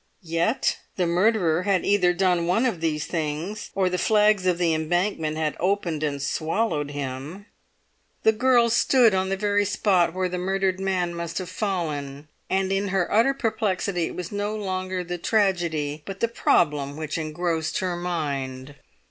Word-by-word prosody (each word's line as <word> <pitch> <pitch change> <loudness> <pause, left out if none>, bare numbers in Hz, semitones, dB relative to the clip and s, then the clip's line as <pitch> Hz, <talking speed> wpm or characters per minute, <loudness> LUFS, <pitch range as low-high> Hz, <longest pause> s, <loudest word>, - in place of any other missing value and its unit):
Yet 170 +8 0 0.2
the 180 - +1
murderer 175 -1 +2
had 190 -2 +1
either 190 -3 +3
done 175 -2 +1
one 225 +8 +2
of 205 -10 -1
these 155 -2 -1
things, 165 +5 -3
or 190 -1 +2
the 180 0 -1
flags 210 -2 +3
of 180 -2 +2
the 170 -2 +2
Embankment 160 0 -1
had 155 -1 -1
opened 180 -4 0
and 145 -2 -1
swallowed 155 +2 -1
him. 145 +7 -6 0.8
The 220 - +6
girl 235 +1 +3
stood 235 -1 +4
on 190 0 0
the 195 - -1
very 205 0 +1
spot 185 -4 +2
where 185 0 0
the 180 0 -4
murdered 190 0 0
man 185 -3 -1
must 170 -1 -5
have 185 -2 -4
fallen, 150 -8 -3 0.2
and 190 0 0
in 195 +1 0
her 190 -2 0
utter 235 +6 +4
perplexity 200 -7 -1
it - - -8
was 180 -1 -5
no 205 +1 -2
longer 185 -2 -3
the 175 0 -5
tragedy 170 -8 0
but 195 +4 -7
the 230 - +2
problem 150 -10 +1
which 155 0 -3
engrossed 160 0 -2
her 185 -2 -1
mind. 145 -6 -3
180 Hz, 165 wpm, -24 LUFS, 160-200 Hz, 0.8 s, The